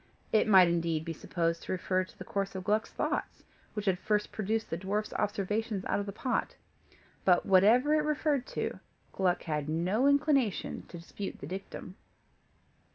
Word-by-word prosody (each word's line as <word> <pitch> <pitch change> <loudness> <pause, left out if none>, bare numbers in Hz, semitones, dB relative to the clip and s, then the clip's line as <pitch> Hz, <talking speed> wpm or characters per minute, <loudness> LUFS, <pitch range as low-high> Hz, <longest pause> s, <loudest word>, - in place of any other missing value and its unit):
It 220 - +3
might 190 -4 +8
indeed 165 -2 0
be 165 - -3
supposed 165 +1 -2
to - - -6
refer 185 0 0
to 185 - -15
the - - -7
course 200 -1 -3
of 185 - -4
Gluck's 210 +3 +1
thoughts, - - -3 0.3
which 210 -1 -3
had 185 -3 +2
first 210 -1 0
produced 220 +1 -2
the 165 - -1
dwarf's 205 +3 -2
observations 210 0 -1
out - - 0
of 205 - -4
the - - -3
pot; 250 +5 -2 0.7
but 180 -2 +4
whatever 220 +10 +5
it 310 - +4
referred 300 -3 0
to, - - -3 0.3
Gluck 180 -2 +1
had 150 -2 -2
no 185 - +1
inclination 280 - +1
to 175 - -9
dispute 185 +4 -7
the - - -8
dictum. 185 +2 -7
195 Hz, 170 wpm, -30 LUFS, 180-220 Hz, 0.7 s, might